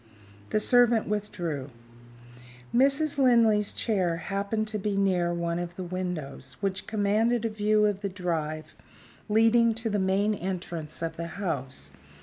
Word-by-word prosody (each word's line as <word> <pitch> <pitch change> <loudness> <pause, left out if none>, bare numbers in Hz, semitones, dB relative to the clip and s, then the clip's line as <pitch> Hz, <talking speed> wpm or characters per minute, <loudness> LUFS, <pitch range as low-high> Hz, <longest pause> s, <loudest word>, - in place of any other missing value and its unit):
The - - +1
servant 240 0 +4
withdrew. 175 -9 -3 1.0
Mrs. 280 +4 +2
Linley's 230 -5 +4
chair 185 -7 0
happened 200 +4 -2
to 215 0 -3
be 200 0 -1
near 185 -3 +2
one 170 0 -2
of 175 0 -5
the 185 - -5
windows, 160 -8 -5
which 190 -1 -3
commanded 220 +3 +1
a - - +1
view 215 0 +2
of 205 -2 0
the 200 - -2
drive 160 -4 -3 0.6
leading 225 +1 +4
to 225 0 -3
the 205 - +1
main 195 +3 +2
entrance 175 -5 -5
of 165 - -3
the 170 0 -4
house. 135 - -4
200 Hz, 140 wpm, -27 LUFS, 170-215 Hz, 1.0 s, servant